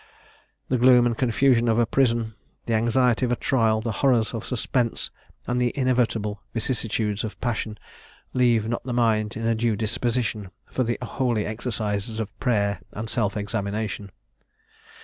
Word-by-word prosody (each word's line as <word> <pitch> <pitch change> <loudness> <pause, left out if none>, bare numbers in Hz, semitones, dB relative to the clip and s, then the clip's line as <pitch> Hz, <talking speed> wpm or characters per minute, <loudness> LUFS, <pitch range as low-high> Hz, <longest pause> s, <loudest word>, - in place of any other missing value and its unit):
The 125 - +1
gloom 125 0 +6
and 120 -1 +1
confusion 120 0 +3
of 115 -1 +3
a 120 - +4
prison, 115 -2 +1 0.3
the 115 - -1
anxiety 120 +2 +2
of 125 - +1
a - - +3
trial, 110 -4 +2
the 115 0 -2
horrors 125 -5 +3
of 115 - -4
suspense, 120 -1 -1 0.3
and 125 0 0
the 120 -1 +2
inevitable 115 -5 +1
vicissitudes 110 -3 -1
of 110 - -6
passion, 110 -3 -2 0.6
leave 120 -4 +3
not 120 +1 -2
the 125 -1 -4
mind 110 -3 +1
in 115 - -3
a 115 - +3
due 115 0 +1
disposition 115 -1 -1 0.2
for - - -3
the 120 0 -1
holy 120 -3 0
exercises 110 -1 -2
of 110 -1 -4
prayer 100 -7 +1
and 110 +2 -4
self 105 -3 0
examination. 100 0 -3
115 Hz, 155 wpm, -25 LUFS, 110-125 Hz, 0.6 s, gloom